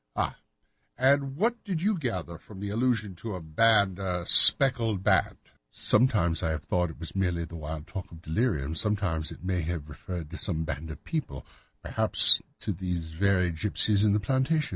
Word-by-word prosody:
"Ah, - - -2 0.6
and 135 +1 +2
what 230 +6 -1
did 185 -6 -3
you 205 +5 0
gather 95 - -5
from 100 0 -13
this 100 0 -5
allusion 115 -3 -1
to 105 +2 -6
a - - -6
band—a 95 0 +1
speckled 115 -7 +6
band?" - - +1 0.3
"Sometimes 105 -9 +1
I 80 - -1
have 80 0 -3
thought 90 0 0
that 80 - -9
it - - -20
was 80 +2 -8
merely 90 -3 -1
the 85 - -11
wild 80 -1 -7
talk 95 +1 -8
of 85 0 -13
delirium, 80 - -1
sometimes 95 -5 -2
that - - -11
it - - -11
may 90 -1 -1
have 80 -2 -5
referred 85 +1 -8
to 85 - -7
some 80 -4 -2
band 80 0 -6
of 80 - -10
people, 100 - -5 0.4
perhaps - - +6 0.2
to - - -3
these 90 -3 -5
very 90 +1 +1
gipsies 105 +4 +1
in 105 -2 +3
the 105 - +2
plantation. 135 +6 0
95 Hz, 185 wpm, -27 LUFS, 80-115 Hz, 0.6 s, speckled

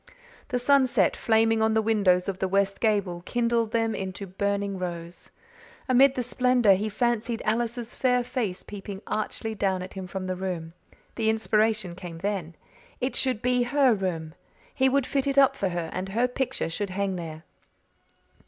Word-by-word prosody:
The 250 - -1
sunset, 260 0 +3
flaming 225 0 +2
on 220 0 +2
the 220 - +4
windows 200 -5 +3
of 190 -1 -3
the 190 - 0
west 195 +1 +1
gable, 200 -6 +1
kindled 235 -2 +1
them 225 -1 +1
into 190 0 -5
burning 200 +1 -2
rose. 170 -1 -6 0.6
Amid 265 +1 +5
the 250 - -1
splendour 250 -3 +3
he 205 +3 -1
fancied 235 +1 0
Alice's 235 +1 -1
fair 250 -1 +2
face 230 -7 -3
peeping 200 -1 -8
archly 220 +1 -3
down 190 -3 0
at 185 - -9
him 190 -1 -6
from 190 0 -5
the 185 0 -2
room. 180 -3 -4 0.4
The 220 -2 +1
inspiration 215 -3 +1
came 175 -2 -8
then. 180 -3 -3 0.4
It 255 0 -2
should 255 -4 0
be 250 0 +2
her 260 +1 +3
room; 170 -6 -3 0.4
he 265 0 +3
would 275 0 +2
fit 275 0 -1
it 275 0 0
up 270 -1 +6
for 195 -7 -1
her; 175 -2 -3
and 185 +1 -4
her 235 +5 +1
picture 250 -7 -2
should 200 +4 -3
hang 195 0 -1
there. 160 -2 -7
215 Hz, 170 wpm, -26 LUFS, 185-240 Hz, 0.6 s, up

